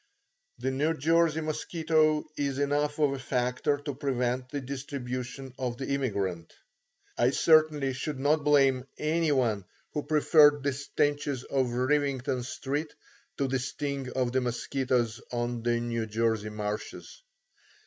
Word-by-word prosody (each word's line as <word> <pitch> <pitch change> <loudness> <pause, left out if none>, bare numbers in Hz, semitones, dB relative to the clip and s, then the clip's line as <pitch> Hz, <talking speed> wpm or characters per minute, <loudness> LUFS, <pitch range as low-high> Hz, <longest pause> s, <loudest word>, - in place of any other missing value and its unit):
The 130 - -1
New 150 +5 +1
Jersey 160 +2 +2
mosquito 155 0 +1
is 140 -2 -1
enough 145 +1 0
of 145 -3 +2
a 135 - -4
factor 125 +2 0
to 145 0 -5
prevent 125 -2 -1
the 145 - -3
distribution 130 -1 -5
of 125 -2 -2
the 135 - -5
immigrant. 100 -11 -2 0.7
I 120 - +5
certainly 150 -2 +4
should 135 +1 -4
not 145 +2 +2
blame 135 -3 +3
any 160 +1 +1
one 115 -7 +1 0.3
who 150 - -1
preferred 150 -1 +5
the 140 -1 +1
stenches 145 -1 -1
of 130 -2 0
Rivington 130 -1 0
Street 140 +5 -3 0.5
to 140 - +1
the 135 0 0
sting 140 0 -4
of 125 -2 0
the 130 +1 +1
mosquitoes 120 -1 -1
on 120 -1 -2
the 120 0 +1
New 115 -1 -2
Jersey 110 -1 0
marshes. 105 - -5
135 Hz, 140 wpm, -29 LUFS, 125-145 Hz, 0.7 s, I